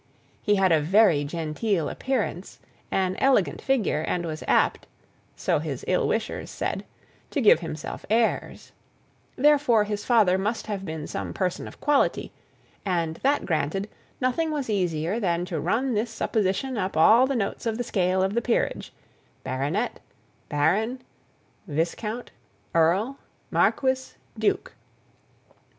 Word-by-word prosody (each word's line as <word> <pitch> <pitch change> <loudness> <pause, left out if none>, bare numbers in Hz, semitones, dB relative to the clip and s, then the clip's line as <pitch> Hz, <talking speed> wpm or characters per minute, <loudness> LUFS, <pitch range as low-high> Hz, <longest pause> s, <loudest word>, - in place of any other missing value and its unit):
He 210 - +2
had 190 -2 +3
a 160 -2 +4
very 175 -2 +4
genteel 165 +4 -1
appearance, 255 -8 -3 0.3
an 185 -1 0
elegant 265 -8 +2
figure, 235 - +1
and 175 +2 -2
was 155 -1 -5
apt - - +2 0.5
so - - 0
his - - -5
ill - - +2
wishers - - -2
said - - -3 0.4
to 290 - -1
give 215 - +6
himself 160 -3 -6
airs; 225 +1 0 0.6
therefore, 280 -6 +4
his 210 0 -3
father 210 -6 +4
must 210 +4 -2
have 205 -3 -4
been 160 -3 -5
some - - -5
person 185 -2 -2
of - - -12
quality; 290 -1 +1 0.5
and, 170 -4 -1
that 280 +2 +1
granted, 165 +4 -1 0.3
nothing 255 +6 0
was 285 -7 -2
easier 180 0 0
than 175 -4 0
to 170 -3 -3
run 235 - 0
this 220 +2 0
supposition 220 +2 -1
up 185 -4 -2
all 230 +10 +6
the 275 - -1
notes 220 +1 -2
of 220 -1 -1
the 245 - -1
scale 185 -4 +1
of 190 +1 0
the 235 - +1
peerage, 235 0 -1 0.5
baronet, 145 - -2 0.5
baron, 195 - +1 0.7
viscount, 180 +9 -3 0.4
earl, 185 +11 +2 0.3
marquis, 260 -1 +1 0.2
duke. - - 0
200 Hz, 135 wpm, -25 LUFS, 170-235 Hz, 0.7 s, give